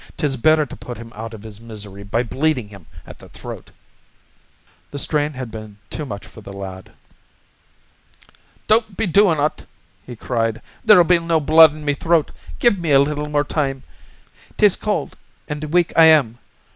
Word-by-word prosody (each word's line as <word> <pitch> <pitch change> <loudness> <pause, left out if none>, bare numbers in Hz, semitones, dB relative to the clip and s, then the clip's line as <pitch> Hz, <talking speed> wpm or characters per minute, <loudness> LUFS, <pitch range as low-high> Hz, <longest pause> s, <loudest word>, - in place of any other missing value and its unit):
"'Tis 145 -5 -1
better 155 +5 +3
to - - -10
put 120 - -9
him 115 0 -11
out 110 +1 -7
iv 110 -2 -11
his 110 -1 -10
misery 105 -3 -9
by 100 +4 -1
bleedin' 130 -1 -1
him 100 -6 -14 0.2
at - - -13
the - - -15
throat." - - -10 1.2
The 145 - -7
strain 150 +1 0
had 130 -3 -7
been 110 -2 -9
too 150 - -5
much 100 -3 -7
for 110 - -14
the 100 - -10
lad. 95 -1 -9 1.7
"Don't 215 -2 +1
be 225 - +1
doin' 185 -3 +3
ut," 150 +2 -2 0.4
he 125 - -9
cried. 115 -1 -2 0.2
"There'll 210 -5 +7
be 175 0 +3
no 165 -1 +1
blood 155 +1 +7
in 155 -1 -10
me 145 - +1
throat. 160 +1 +1 0.3
Give 235 -6 +2
me 165 -3 -2
a 135 - +7
little 150 +1 -1
time. 135 -3 -2 0.7
'Tis 205 -3 +5
cold 210 -1 -3 0.3
an' 150 -1 -4
weak 175 +1 +2
I 165 - +7
am. 140 -8 +4
145 Hz, 170 wpm, -20 LUFS, 115-160 Hz, 1.7 s, There'll